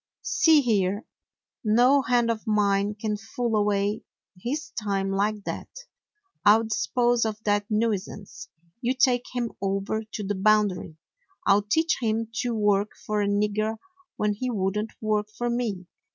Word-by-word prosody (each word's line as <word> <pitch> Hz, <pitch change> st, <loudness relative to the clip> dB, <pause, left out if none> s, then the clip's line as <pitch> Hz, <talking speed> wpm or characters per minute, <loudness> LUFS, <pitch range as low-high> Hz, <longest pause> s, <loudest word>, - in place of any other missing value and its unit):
"See 320 Hz, -3 st, +4 dB
here, 205 Hz, -4 st, 0 dB, 0.6 s
no 245 Hz, +6 st, +4 dB
hand 240 Hz, -3 st, +2 dB
of 225 Hz, +1 st, -5 dB
mine 205 Hz, -1 st, +2 dB
can 210 Hz, 0 st, -2 dB
fool 225 Hz, +2 st, -3 dB
away 205 Hz, 0 st, +1 dB, 0.3 s
his 285 Hz, +11 st, -4 dB
time 195 Hz, -3 st, -2 dB
like 205 Hz, +1 st, 0 dB
that. -, -, -5 dB, 0.7 s
I 205 Hz, +1 st, +7 dB
'll 225 Hz, -, -1 dB
dispose 240 Hz, +2 st, +1 dB
of 220 Hz, -2 st, -2 dB
that 205 Hz, -1 st, +1 dB
nui 215 Hz, 0 st, +2 dB
sance. 200 Hz, +1 st, -10 dB, 0.3 s
You 250 Hz, +1 st, 0 dB
take 250 Hz, -1 st, +3 dB
him 240 Hz, -2 st, -1 dB
over 195 Hz, +2 st, -1 dB
to 210 Hz, -, -4 dB
the 205 Hz, +1 st, -1 dB
Boundary. 200 Hz, -5 st, +1 dB, 0.5 s
I -, -, +6 dB
'll 205 Hz, -, +3 dB
teach 320 Hz, +11 st, +1 dB
him 225 Hz, 0 st, -1 dB
to 240 Hz, -2 st, -1 dB
work 205 Hz, -1 st, +1 dB
for 210 Hz, -1 st, 0 dB
a 200 Hz, -, +1 dB
nigger 210 Hz, +2 st, 0 dB, 0.4 s
when 210 Hz, 0 st, 0 dB
he 255 Hz, +5 st, -3 dB
would 195 Hz, -3 st, -1 dB
n't 215 Hz, +1 st, -4 dB
work 215 Hz, -1 st, 0 dB
for 240 Hz, 0 st, -1 dB
me! 220 Hz, -7 st, -2 dB
215 Hz, 160 wpm, -26 LUFS, 205-235 Hz, 0.7 s, I